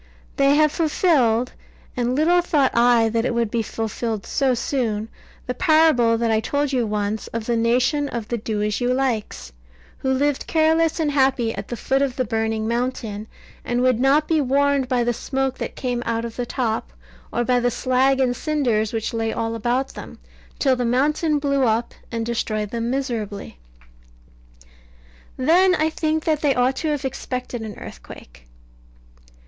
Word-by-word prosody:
They 275 +1 +4
have 305 0 +4
fulfilled 275 -8 +2 0.4
(and 245 0 0
little 340 +5 +3
thought 295 -6 +1
I 235 -1 +4
that 225 +1 0
it 235 - -1
would 230 -2 0
be 235 - 0
fulfilled 225 -1 -4
so 265 -2 +1
soon) 225 -4 -2 0.4
the 250 - -2
parable 310 -6 +4
that 230 0 0
I 220 - +3
told 285 +4 -1
you 245 -3 +1
once, 210 0 -2
of 230 -1 -5
the 235 - 0
nation 250 +5 +1
of 230 -3 -5
the 235 - -2
Do 210 -1 -2
as 210 +2 -1
you 245 0 +1
likes, 215 - -2 0.5
who 265 - -2
lived 280 +1 0
careless 320 +1 +2
and 305 -2 +1
happy 265 -5 +2
at 200 0 -6
the 240 - -5
foot 270 +4 0
of 270 -3 0
the 255 - -1
burning 220 -1 -1
mountain, 230 -3 -3 0.4
and 240 0 -1
would 255 -2 +3
not 280 +4 +3
be 320 -2 +2
warned 280 0 +2
by 250 -2 +1
the 240 0 0
smoke 265 +2 -2
that - - -5
came 245 -2 -2
out 230 0 -2
of 230 - -7
the 245 -1 -3
top, 225 - -2 0.4
or 240 - 0
by 250 0 +2
the 245 0 +1
slag 260 +2 +1
and 250 -2 +2
cinders 245 -9 0
which 225 0 -2
lay 225 -1 -1
all 225 0 -2
about 245 +4 -1
them; - - -10 0.4
till 265 -3 +2
the 250 - -2
mountain 295 +6 +1
blew 280 -1 0
up, 225 +1 0 0.2
and 230 -1 -2
destroyed 215 -3 -2
them 235 0 -2
miserably. 225 - -4 1.8
Then 360 +8 +4
I 315 -1 +1
think 315 0 -1
that 310 -2 0
they 285 -3 +2
ought 250 +2 +1
to 320 - -2
have 295 -2 -1
expected 250 -2 -4
an 215 -2 -7
earthquake. - - -12
245 Hz, 175 wpm, -22 LUFS, 225-280 Hz, 1.8 s, They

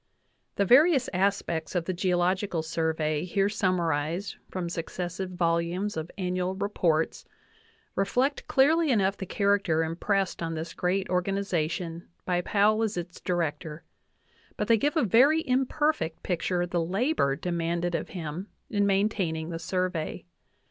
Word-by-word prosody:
The 200 - +2
various 270 - +5
aspects 185 -3 0
of 175 -2 0
the 185 - -1
Geological 180 -1 0
Survey 160 -2 -1
here 195 +2 +1
sum 185 -3 +1
marized 165 +3 -1
from 185 -2 -3
successive 175 +2 -4
volumes 175 +3 0
of 160 +1 -4
Annual 185 0 -1
Reports 180 -5 0 0.7
reflect 250 +8 0
clearly 310 +4 +4
enough 200 -5 +2
the 190 - -6
character 200 -5 +2
impressed 190 +4 -1
on 165 -1 -2
this 165 +1 -5
great 190 +2 0
organiza 180 -3 0
tion 170 -1 -5 0.2
by 180 -1 +1
Powell 210 +4 +3
as 220 -4 -1
its 175 0 -6
Director; 160 -2 -2 0.7
but - - -1
they 230 -1 +5
give 290 +8 0
a 310 - +3
very 270 - +4
imperfect 260 - 0
picture 175 0 0
of 175 - -5
the 170 -2 +1
labor 190 - +1
demanded 170 +1 -2
of - - -2
him 170 +2 -5 0.2
in 205 -1 +2
maintaining 195 -5 0
the 165 - -4
Sur 185 +1 0
vey. 165 -4 -5
180 Hz, 145 wpm, -27 LUFS, 165-200 Hz, 0.7 s, various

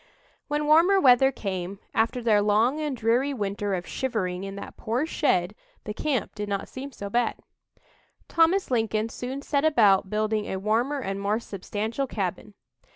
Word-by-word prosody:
When 295 0 -1
warmer 335 +6 +5
weather 265 -2 +6
came, 190 -4 -4 0.2
after 230 +2 0
their 215 -3 +4
"long 220 +8 +2
and 295 -4 -2
dreary 245 +5 +1
winter" 205 -2 -2
of 180 0 -5
shivering 195 -8 -2
in 195 0 -6
that 200 - -8
poor 240 +6 -1
shed, 200 - +1 0.3
the 210 - -5
"camp" 270 +1 -2
did 210 -1 -5
not 200 -1 -2
seem 275 +2 -8
so 200 -5 -7
bad. 235 +3 0 0.9
Thomas 335 +1 +2
Lincoln 225 -2 0
soon 260 +4 -6
set 285 -1 0
about 210 -11 +4
building 215 0 -1
a 190 - -3
warmer 235 +8 0
and 195 -3 -4
more 205 +2 0
substantial 220 +5 -4
cabin. 200 -1 -4
225 Hz, 160 wpm, -26 LUFS, 200-270 Hz, 0.9 s, weather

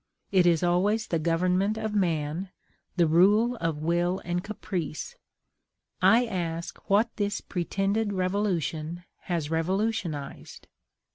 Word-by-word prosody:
It 185 -3 +4
is 170 -1 +3
always 200 +5 +2
the 165 - -1
government 180 +6 +1
of 220 -1 -3
man, 170 -2 0 0.5
the 175 -2 +4
rule 205 +9 +4
of 165 -4 -1
will 175 +3 +1
and 175 0 -1
caprice. 195 - -4 0.9
I 240 +2 +5
ask 170 -5 -4
what 215 +4 +3
this 205 -1 -1
pretended 200 +4 -1
revolution 180 -4 -1 0.2
has 165 -4 -2
revolutionized? 170 -3 -2
180 Hz, 115 wpm, -27 LUFS, 165-205 Hz, 0.9 s, I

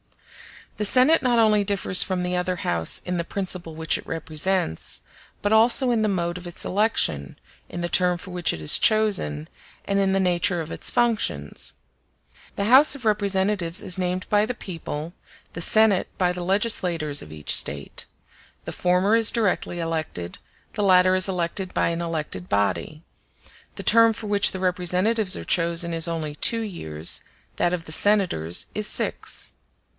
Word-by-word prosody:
The 210 - 0
Senate 260 +9 +5
not 245 -2 +1
only 215 -2 +3
differs 195 -2 +2
from 185 -1 -1
the 180 0 -2
other 180 0 -1
House 85 - +1
in 180 0 -2
the 170 - -1
principle 180 -3 -5
which 160 0 -1
it - - -14
represents, 160 - -2 0.4
but 205 +1 +1
also 235 +3 +5
in 230 -2 +1
the 215 - +1
mode 175 -2 -2
of 175 - -10
its 175 - -7
election, 195 - 0 0.3
in 175 - -6
the 175 - -3
term 180 -1 +2
for 185 +2 -11
which 180 -1 0
it 80 - -7
is 75 - +6
chosen, 195 - +1 0.4
and 200 0 0
in 195 -1 +1
the 195 - +1
nature 180 -1 +1
of 160 -1 -6
its - - -3
functions. 215 - -1 0.8
The 200 - -2
House 265 +8 +6
of 260 -4 -11
Representatives 200 -3 0
is 185 0 -1
named 180 0 -2
by 205 0 +3
the 250 - -4
people, 165 -4 -7 0.4
the 165 - -5
Senate 215 +1 +3
by 180 -1 +1
the 180 0 -6
legislators 175 -7 0
of 75 - -11
each 75 -1 0
State; 70 0 -2 0.6
the - - -5
former 180 +4 +1
is 230 -1 +4
directly 200 -5 -1
elected, 160 - -4 0.3
the - - -3
latter 185 -1 +4
is 185 +1 +4
elected 180 +1 -3
by - - +1
an 170 0 -3
elected 155 - -5
body; 100 - -1 0.7
the - - -7
term 230 0 +6
for 220 - -8
which 205 -1 +3
the 190 - -6
representatives 185 +3 0
are - - -7
chosen 170 -1 0
is 165 0 -1
only 160 -3 -4
two 230 +9 +1
years, 80 - -3 0.4
that 175 - +1
of 170 -2 -4
the - - -10
senators 175 - +1
is 210 0 -1
six. - - -2
180 Hz, 170 wpm, -23 LUFS, 165-205 Hz, 0.8 s, is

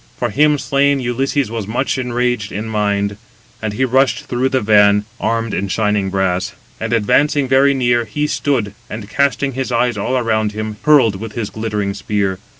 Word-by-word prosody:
For 120 -3 -2
him 150 +6 +3
slain, 140 +1 +1
Ulysses 130 +1 -1
was 115 -4 -4
much 130 +4 -1
enraged 125 -3 -1
in 105 +3 -4
mind; 100 -1 -1 0.4
and 110 -2 -3
he 130 +5 +1
rushed 130 +1 +2
through 125 +2 0
the 130 -1 +1
van, 105 -1 +4
armed 115 0 -1
in 100 - -1
shining 105 -1 0
brass; 95 -1 -1 0.3
and 110 0 -3
advancing 135 +6 +2
very 135 +2 +4
near, 120 -2 +1
he 150 +8 -2
stood, 130 -9 -1 0.2
and 110 -2 -7
casting 140 +3 0
his 130 0 -4
eyes 120 -2 +1
all 130 +6 0
around 110 -3 0
him, 110 0 -5
hurled 135 -10 +4
with 110 +1 -7
his 105 -3 -4
glittering 105 -2 -2
spear. 100 -2 -2
115 Hz, 175 wpm, -17 LUFS, 105-130 Hz, 0.4 s, van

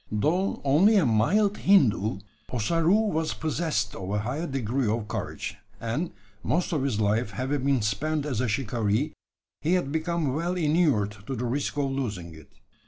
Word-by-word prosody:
Though 160 - 0
only 160 +11 +5
a 195 - +4
"mild 195 - +3
Hindoo," 110 - +3 0.3
Ossaroo 165 - +2
was 160 0 -1
possessed 155 -10 -1
of 95 0 -6
a 105 - 0
high 130 +11 -2
degree 130 -2 -1
of 110 0 -1
courage; 100 -2 -4 0.2
and, 120 +10 -2 0.3
most 175 +8 0
of 150 - +1
his 130 -6 -1
life 105 +2 +1
having 130 +6 -2
been 135 -5 +2
spent 145 +9 -1
as 130 -6 -1
a 125 - 0
shikaree, 115 +3 0 0.5
he 165 +4 +1
had 175 -7 +1
become 160 -3 -1
well 170 +5 -1
inured 150 - +2
to 135 - -2
the 125 +1 -3
risk 140 +4 -2
of 140 -2 0
losing 105 -11 -4
it. 80 -2 -14
135 Hz, 170 wpm, -27 LUFS, 110-160 Hz, 0.5 s, only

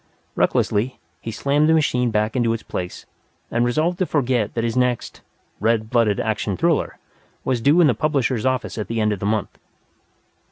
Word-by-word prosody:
Recklessly, 115 +6 +1 0.2
he - - -6
slammed 140 +7 +1
the 160 - +5
machine 125 -6 +2
back 110 +1 0
into 120 -2 +2
its 115 - -5
place, 90 -1 -6 0.5
and 120 - +1
resolved 155 +9 0
to 185 - +1
forget 125 -7 0
that 115 - -1
his 115 -1 -1
next 125 -1 -1 0.4
"red 110 +1 0
blooded 115 -5 +2
action 105 -3 -1
thriller" 170 -2 0 0.5
was 125 -3 0
due 145 +8 +4
in - - +6
the 140 - +4
publisher's 130 -2 0
office 130 -3 -1
at 105 - -3
the 115 0 -2
end 105 -1 +2
of 100 - -5
the 100 - -2
month. 105 -1 -2
120 Hz, 185 wpm, -21 LUFS, 110-140 Hz, 0.5 s, in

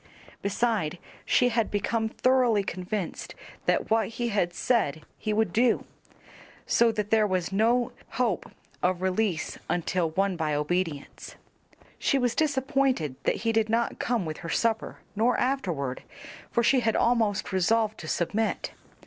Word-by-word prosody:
Beside 200 -5 0 0.3
she 250 - +4
had 230 -2 +1
become 220 +2 0
thoroughly 245 -4 +3
convinced 185 0 -4 0.3
that - - +1
what 220 -2 +3
he 235 +1 -3
had 200 -5 +1
said 175 - 0 0.2
he 215 - -2
would 210 -4 +1
do, 235 +1 +3 0.8
so 235 -1 +4
that 210 -1 -3
there 220 -1 +4
was 185 -2 -1
no 230 +4 +2 0.2
hope 230 -6 0 0.3
of 180 0 0
release 190 -2 -1
until 175 -1 0
won 195 +3 0
by 155 -3 -1
obedience. 150 0 -3 0.6
She 275 - +2
was 245 -3 +1
disappointed 270 - +1
that - - +2
he 230 - +3
did 220 -1 +1
not 230 +1 0
come 235 -6 0
with 155 -1 -4
her 165 - -7
supper 225 +4 0 0.2
nor 230 +4 +2
afterward, 175 - -1 0.5
for 235 - +1
she 260 +3 +4
had 225 -2 +1
almost 220 -4 +1
resolved 215 +4 +2
to 160 - -8
submit. 210 +8 -1
215 Hz, 145 wpm, -27 LUFS, 180-235 Hz, 0.8 s, she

